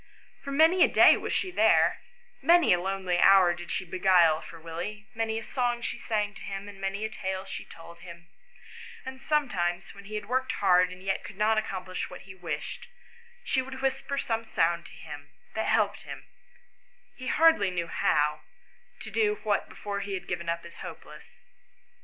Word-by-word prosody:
For 280 - -5
many 320 +6 +5
a - - +6
day - - +7
was - - -4
she 375 - -1
there; - - +3 0.4
many 340 - +5
a 175 - +1
lonely 190 -1 -1
hour 190 -2 +6
did 175 0 -9
she 185 - -2
beguile 180 -3 +4
for 165 - -11
Willie; 175 +6 -6
many 225 0 -1
a 225 - -4
song 240 -1 -1
she - - -4
sang 210 -2 -1
to - - -13
him, 195 +1 -6
and 200 -1 -11
many 195 +2 -2
a - - -3
tale 190 -2 -4
she 195 - -7
told 170 +1 -13
him; 170 -1 -12 0.8
and 260 0 -8
sometimes, 195 - -1
when 200 0 -13
he 215 +2 -7
had 210 - -4
worked 260 +3 -1
hard 180 -2 +3
and 185 0 -11
yet 195 0 -1
could 195 - -10
not 215 +1 +2
accom 190 -4 -5
plish 185 -1 -4
what 180 - -10
he 190 - -12
wished, 170 -5 -6 0.6
she 265 - +1
would 260 0 -8
whisper 270 +1 -1
some 230 -4 -1
sound 170 -5 0
to - - -15
him, - - -10 0.2
that - - -2
helped - - +1
him, - - -9 0.9
he 255 - -8
hardly 320 -13 +4
knew 175 -2 -2
how, 150 -2 +1 0.6
to - - -8
do 425 -1 +2
what 210 -2 0
before 200 -1 -5
he 200 0 -4
had 185 - -7
given 170 0 -3
up 170 0 -2
as 170 - -12
hopeless. - - -11
195 Hz, 190 wpm, -28 LUFS, 175-235 Hz, 0.9 s, day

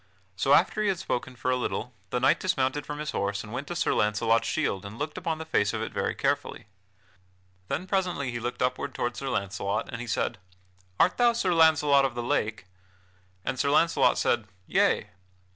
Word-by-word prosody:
So, 135 +9 +2
after 215 - +2
he 210 - +1
had 195 -2 +1
spoken 125 -4 -3
for 130 +1 -1
a - - +3
little, 125 -1 -3 0.2
the 125 - -1
knight 140 +6 +3
dismounted 145 -5 0
from 150 - -4
his 150 0 -3
horse 100 0 -2
and 105 0 -10
went 135 +3 -4
to 175 - -4
Sir - - +1
Launcelot's 115 +2 +2
shield 120 -11 -1
and 100 +3 -8
looked 150 +3 -4
upon 160 -1 -2
the 160 - -6
face 105 -10 +1
of - - -2
it - - -5
very - - -1
carefully. - - -1 1.0
Then 180 - -2
presently 180 -9 -1
he 120 - -4
looked 120 +2 -3
upward 130 +1 -2
toward 120 0 -2
Sir 135 - -4
Launcelot, 100 +2 -2
and 115 -1 -5
he 120 - -6
said: 110 0 -1 0.6
"Art 180 - +4
thou 240 -1 +4
Sir 190 -6 +1
Launcelot 155 -4 +5
of 135 -3 -1
the 120 - -3
Lake?" 110 -4 -1 0.8
And 130 -1 -2
Sir 140 - +2
Launcelot 165 +3 +4
said: 115 -3 +1 0.2
"Yea." - - +2
130 Hz, 200 wpm, -27 LUFS, 115-155 Hz, 1.0 s, Launcelot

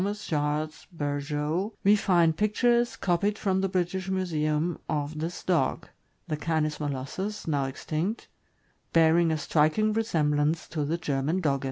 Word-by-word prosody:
Charles 150 -3 -2
Berjeau, 150 +5 -2
we 205 +2 +6
find 175 -5 +3
pictures, 235 +4 +2
copied 200 +3 0
from 190 -3 0
the 195 - 0
British 185 +1 -1
Museum, 165 -3 0
of 150 0 -2
this 165 +3 -4
dog 165 -8 0 0.2
— - - -43
the 155 - -1
Canis 155 -1 -1
molossus, 150 +9 -4
now 145 -3 +1
extinct 155 - -3 0.3
— - - -41
bearing 165 +1 +5
a 160 - +1
striking 155 +8 +2
resemblance 155 -7 +1
to 150 -3 -2
the 160 +4 -1
German 150 +2 -1
Dogge. 140 -6 +1
160 Hz, 145 wpm, -27 LUFS, 150-190 Hz, 0.3 s, we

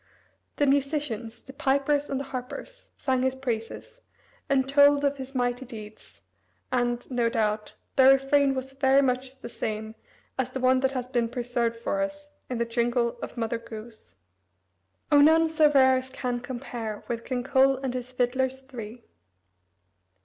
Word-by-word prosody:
The 290 - +2
musicians 275 -5 -1
the 270 - -12
pipers 285 0 +1
and 270 - -1
the - - -3
harpers 270 - -8
sang 260 -2 0
his 260 0 +1
praises, 240 - -5 0.5
and 265 -1 +2
told 285 +1 +5
of 280 0 +1
his 265 0 -8
mighty 245 0 0
deeds, 215 -3 -11 0.5
and, 245 -1 0
no 240 -2 +1
doubt, 215 -2 -1 0.2
their 265 0 +8
refrain 270 0 +3
was 260 +1 -5
very 270 0 +4
much 260 +1 -2
the - - -6
same 220 -2 -4 0.5
as 260 -1 0
the 260 - -5
one 255 0 +4
that 265 0 0
has 250 -2 -3
been 240 -2 0
preserved 240 -1 -1
for 290 +5 -2
us 295 0 -4 0.2
in 250 - -2
the 235 - 0
jingle 235 0 0
of - - -7
Mother 230 0 -1
Goose: 220 - -11 1.0
"O, 290 -1 +7
none 320 +2 +5
so 310 -1 +5
rare 260 -2 +5
as 255 0 -5
can 250 -2 -3
compare 240 -4 -6
With 235 -1 -3
King 250 -2 -3
Cole 270 0 +4
and 265 -1 -3
his 250 0 -4
fiddlers 260 +1 0
three." 235 -3 -9
255 Hz, 165 wpm, -27 LUFS, 235-270 Hz, 1.0 s, their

